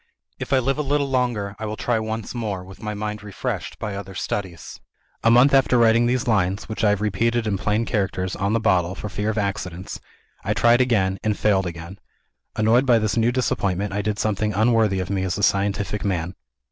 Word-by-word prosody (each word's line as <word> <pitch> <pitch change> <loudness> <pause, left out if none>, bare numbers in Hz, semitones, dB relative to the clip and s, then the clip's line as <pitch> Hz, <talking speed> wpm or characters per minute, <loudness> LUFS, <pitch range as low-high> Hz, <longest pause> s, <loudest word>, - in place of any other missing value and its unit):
If - - -6
I 135 - +5
live 135 +3 0
a - - +2
little 145 0 0
longer, 120 -6 -1
I 110 - -4
will 105 - -4
try 120 -2 0
once 110 0 -4
more, 105 -6 -3
with 95 +1 -13
my 105 -1 -4
mind 105 +1 -4
refreshed 105 -2 -5
by 105 - -4
other 100 -1 -7
studies. 95 -3 -5 0.4
"A 115 - +5
month 125 +4 +6
after 135 -2 +4
writing 115 0 +4
these 125 0 0
lines 100 -3 +1
(which 110 +1 -4
I 105 - +5
have 105 -1 +1
repeated 115 +3 0
in 105 -2 0
plain 105 +3 0
characters, 95 -4 -2
on 100 +2 -1
the 115 - +2
bottle, 95 -4 +1
for 105 - -6
fear 105 +1 -2
of 110 - -2
accidents), 95 -3 -3 0.4
I - - -1
tried 120 +1 +4
again 95 -7 +1
and 105 -1 0
failed 95 -3 +2
again. 85 +3 -8 0.6
Annoyed 115 +5 +3
by 120 -2 +6
this 110 -2 0
new 115 +1 +2
disappointment, 100 -6 -1
I 105 - -1
did 105 0 -2
something 105 0 -1
unworthy 110 -3 +3
of 95 +1 -5
me 95 -1 0
as 95 -2 -2
a 100 - -3
scientific 100 +1 0
man. 90 -2 -2
105 Hz, 210 wpm, -22 LUFS, 95-115 Hz, 0.6 s, month